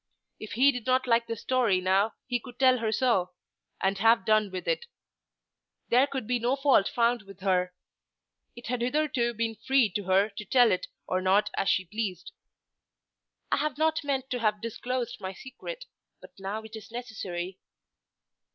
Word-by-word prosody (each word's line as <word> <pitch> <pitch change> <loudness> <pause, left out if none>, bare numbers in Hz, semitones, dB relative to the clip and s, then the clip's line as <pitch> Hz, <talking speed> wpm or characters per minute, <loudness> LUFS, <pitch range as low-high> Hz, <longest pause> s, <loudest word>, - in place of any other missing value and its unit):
If 215 - -7
he 270 +4 +5
did 245 -3 -7
not 255 0 +3
like 235 -1 +2
the 230 - -3
story 230 -4 +1
now 195 +4 +2
he 245 -1 -1
could 245 0 -12
tell 255 -1 +4
her 225 -1 -1
so, 210 -6 +1 0.5
and 195 0 0
have 225 -2 +4
done 215 -1 +3
with 185 -1 -6
it. 475 -1 -1 1.0
There 255 +4 +5
could 265 -4 -4
be 245 +2 0
no 245 +3 +1
fault 270 -7 +4
found 235 0 +1
with 195 -1 -15
her. 180 -2 +1 0.8
It 240 - -11
had 245 0 -2
hitherto 250 -2 0
been 225 0 -1
free 235 0 +2
to 200 +2 -3
her 190 +3 +3
to - - -4
tell 245 +3 +4
it 185 - -1 0.2
or 185 0 -1
not 190 +3 +3
as 195 - 0
she 190 - +2
pleased. 195 - -4 1.2
"I - - +3
had 295 -1 -1
not 315 0 +1
meant 270 -2 -2
to 250 - -1
have 210 -2 +1
disclosed 240 +1 -4
my 190 0 -4
secret, 375 - -9 0.3
but - - -14
now 200 +3 -4
it 220 0 -10
is 220 -1 -10
necessary." 190 -7 -5
230 Hz, 180 wpm, -28 LUFS, 195-255 Hz, 1.2 s, he